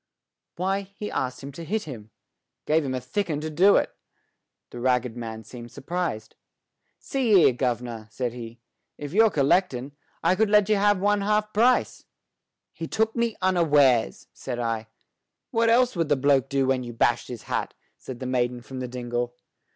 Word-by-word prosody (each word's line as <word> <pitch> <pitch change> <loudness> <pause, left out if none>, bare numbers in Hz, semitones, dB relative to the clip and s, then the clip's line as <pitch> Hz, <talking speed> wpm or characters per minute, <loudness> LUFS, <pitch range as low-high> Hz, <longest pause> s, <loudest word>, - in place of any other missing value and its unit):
"Why, 190 +3 0
he 210 0 -5
asked 130 0 -3
him 140 - -7
to 165 +5 -9
hit 210 +7 -2
him. 115 -8 -9 0.6
Gave 155 +1 +2
him 130 -2 -2
a - - -1
thick 175 +10 -3
'un 150 -2 -1
to 155 0 -4
do 190 +6 +5
it." - - +1 0.8
The 120 - -8
ragged 125 -1 +1
man 110 -2 -6
seemed 120 +1 -10
surprised. 145 -6 -4 0.6
"See 255 -5 0
here, 165 -8 +6
gov'nor," 120 -3 -3
said 120 +1 -3
he. 120 -1 -9 0.4
"If 145 +1 -7
you're 220 +2 +6
collectin', 140 -4 +1 0.3
I 170 - +4
could 215 +2 +2
let 210 -1 +4
you 215 - +4
have 205 -1 +3
one 205 +1 +2
half 210 +1 0
price." 245 +4 +2 0.7
"He 165 - -6
took 220 +4 0
me 235 -2 0
unawares," 145 -10 +3
said 125 -2 -5
I. 115 -2 -2 0.6
"What 230 0 +2
else 245 0 +3
would 165 -3 -1
the 145 - +4
bloke 135 -1 +2
do 135 -1 +1
when 130 -1 +1
you 120 -1 -7
bashed 120 +1 +1
his 120 -3 -8
hat?" - - -3 0.2
said 125 -2 -9
the 130 - -5
maiden 125 -1 -1
from 130 +1 -8
the 125 - -3
dingle. 120 0 -3
140 Hz, 180 wpm, -25 LUFS, 120-195 Hz, 0.8 s, here